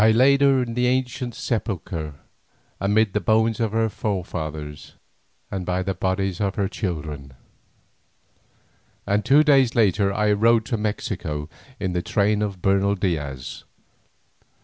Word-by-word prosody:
I 110 Hz, -, +6 dB
laid 135 Hz, +5 st, +5 dB
her 135 Hz, -2 st, +4 dB
in 115 Hz, -1 st, -5 dB
the 125 Hz, +1 st, +1 dB
ancient 125 Hz, -1 st, -1 dB
sepulchre 90 Hz, -, -3 dB, 0.6 s
amid 105 Hz, +1 st, +2 dB
the 105 Hz, -, 0 dB
bones 110 Hz, 0 st, +2 dB
of 115 Hz, -3 st, 0 dB
her 115 Hz, 0 st, +1 dB
forefathers 80 Hz, -8 st, -5 dB, 0.6 s
and 95 Hz, -2 st, -3 dB
by 90 Hz, +1 st, -1 dB
the 95 Hz, +1 st, -1 dB
bodies 95 Hz, 0 st, -1 dB
of 100 Hz, -1 st, 0 dB
her 100 Hz, -2 st, 0 dB
children, 75 Hz, -, -5 dB, 1.7 s
and 105 Hz, +1 st, +1 dB
two 145 Hz, +3 st, +5 dB
days 135 Hz, -5 st, +4 dB
later 100 Hz, -3 st, +3 dB
I 105 Hz, +1 st, +1 dB
rode 110 Hz, +2 st, +3 dB
to 120 Hz, -, -1 dB
Mexico 95 Hz, -8 st, -3 dB, 0.3 s
in 95 Hz, -2 st, -2 dB
the 90 Hz, -, 0 dB
train 105 Hz, +3 st, +1 dB
of 100 Hz, -4 st, -3 dB
Bernal 100 Hz, +1 st, +2 dB
Diaz. 70 Hz, -10 st, -3 dB
100 Hz, 140 wpm, -23 LUFS, 90-115 Hz, 1.7 s, I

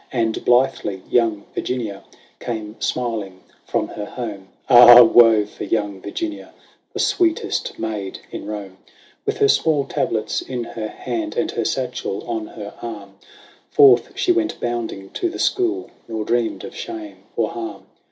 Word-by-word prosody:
And 115 Hz, -3 st, -1 dB
blithely 120 Hz, -6 st, +2 dB
young 110 Hz, -4 st, +2 dB
Virginia 110 Hz, -6 st, -3 dB, 0.4 s
came 110 Hz, -2 st, -5 dB
smiling 105 Hz, -7 st, -2 dB, 0.3 s
from -, -, -1 dB
her 105 Hz, -, -6 dB
home: 105 Hz, -6 st, -6 dB, 0.2 s
Ah! 120 Hz, -1 st, +10 dB
woe 115 Hz, -2 st, +6 dB
for 105 Hz, -, -9 dB
young 105 Hz, -3 st, -2 dB
Virginia, 325 Hz, -, -5 dB, 0.4 s
the -, -, -7 dB
sweetest 335 Hz, -2 st, 0 dB
maid 105 Hz, -4 st, -4 dB
in -, -, -7 dB
Home! 100 Hz, -3 st, -6 dB, 0.5 s
With 425 Hz, 0 st, 0 dB
her 420 Hz, 0 st, +4 dB
small 155 Hz, -, +2 dB
tablets 110 Hz, -4 st, -1 dB
in 125 Hz, -2 st, -4 dB
her 110 Hz, -1 st, -5 dB
hand, 320 Hz, -, -4 dB
and -, -, 0 dB
her -, -, -2 dB
satchel -, -, -3 dB
on 330 Hz, -2 st, -3 dB
her 345 Hz, -, -9 dB
arm, -, -, -8 dB, 0.5 s
Forth 415 Hz, -2 st, +5 dB
she 360 Hz, -, +2 dB
went 345 Hz, -2 st, 0 dB
bounding 115 Hz, -5 st, -4 dB
to 355 Hz, -, -1 dB
the -, -, -7 dB
school, 370 Hz, -1 st, 0 dB, 0.2 s
nor 110 Hz, -2 st, -4 dB
dreamed 120 Hz, 0 st, 0 dB
of -, -, -8 dB
shame 325 Hz, -2 st, -7 dB, 0.2 s
or -, -, +1 dB
harm. 345 Hz, -1 st, -6 dB
120 Hz, 150 wpm, -21 LUFS, -, 0.5 s, Ah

